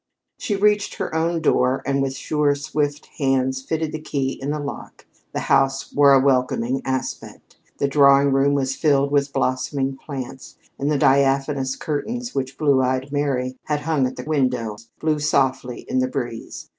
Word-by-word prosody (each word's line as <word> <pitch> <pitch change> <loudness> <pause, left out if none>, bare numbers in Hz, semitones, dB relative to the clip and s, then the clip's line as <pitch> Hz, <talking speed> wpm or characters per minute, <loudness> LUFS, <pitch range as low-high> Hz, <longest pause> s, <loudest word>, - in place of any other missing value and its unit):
She 205 - -1
reached 210 +1 +2
her - - -4
own 165 +1 0
door, 130 -3 +2
and 140 0 +1
with 135 -1 -1
sure, 150 0 +1
swift 145 0 -2
hands, 130 -1 +1
fitted 160 +3 -2
the 155 - -5
key 135 -3 -2
in 135 - -3
the 150 - -1
lock. 145 -2 -7 0.3
The - - -3
house 135 0 +1
wore 145 -1 +6
a 135 - +7
welcoming 130 -1 +1
aspect. 130 0 -5 0.2
The 140 - +1
drawing 140 0 +5
room 140 +1 +3
was 135 -1 0
filled 140 -2 +2
with 140 -1 +1
blossoming 135 +1 -1
plants, 135 -1 -8 0.2
and 140 - 0
the 150 - +2
diaphanous 135 -1 +2
curtains 235 +11 -4
which 135 0 -3
Blue 140 -4 +3
eyed 130 +2 -1
Mary 130 -3 -1
had 150 -1 -1
hung 150 -4 +1
at 130 - -7
the 125 - -6
windows 125 -7 -1
blew 155 -1 0
softly 135 -4 0
in 130 - -2
the 130 - +1
breeze. 120 -4 -5
140 Hz, 170 wpm, -22 LUFS, 130-145 Hz, 0.3 s, a